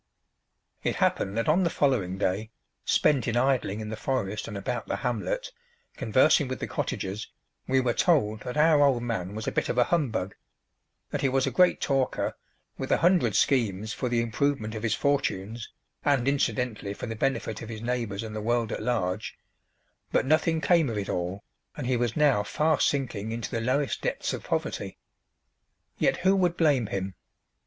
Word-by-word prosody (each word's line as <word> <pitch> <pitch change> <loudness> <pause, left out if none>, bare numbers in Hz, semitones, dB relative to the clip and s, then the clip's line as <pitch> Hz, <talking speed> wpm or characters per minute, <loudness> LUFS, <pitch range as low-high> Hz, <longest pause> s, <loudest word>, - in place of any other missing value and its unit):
It - - -1
happened 100 +2 0
that 115 - 0
on 160 +5 +4
the 175 - +2
following 115 - +1
day, 100 +3 -1 0.4
spent 140 -5 +3
in 115 0 0
idling 120 -5 +1
in 105 - -5
the 110 - -3
forest 105 -3 -2
and 105 - -5
about 100 - -3
the - - -1
hamlet, - - -2 0.4
conversing 130 +5 +3
with 130 0 -4
the - - -2
cottagers, 100 +3 -3 0.4
we 130 0 +3
were 120 -2 +1
told 110 - +2
that 125 +6 -6
our 155 -1 +5
old 135 -4 +3
man 105 -5 -3
was 110 - -4
a - - +1
bit - - -1
of - - -1
a 125 - +6
humbug; 120 - -1 0.8
that 145 - -2
he 135 - +2
was 130 0 +2
a - - -1
great 180 -1 +4
talker, 135 -2 0 0.4
with - - -3
a - - +5
hundred 175 +2 +3
schemes 110 -5 +1
for 125 - -2
the 120 -1 +2
improvement 115 -1 -1
of 110 - -5
his 110 -1 +1
fortunes, 115 -6 -1 0.3
and, 140 -4 +2
incidently, 125 -7 0
for - - -6
the 115 -1 -4
benefit 110 -3 -1
of 115 - -7
his 110 -1 -7
neighbours 115 -4 -2
and 110 -1 -6
the 110 - -3
world 120 0 0
at - - -3
large; 110 -4 -2 0.7
but - - +2
nothing 160 +2 +2
came 165 -6 +3
of 110 - -3
it 100 -2 -3
all 90 +3 -3 0.3
and - - -4
he 125 0 +1
was 120 -2 0
now 145 -8 +4
fast 150 +9 +2
sinking 115 -7 -2
into 115 +1 -4
the 115 -3 -1
lowest 130 +4 0
depths - - -2
of - - -5
poverty. - - -3 1.0
Yet - - +2
who 190 +2 +3
would 180 -2 +1
blame 145 -8 +3
him? 95 -1 -3
120 Hz, 185 wpm, -27 LUFS, 105-140 Hz, 1.0 s, a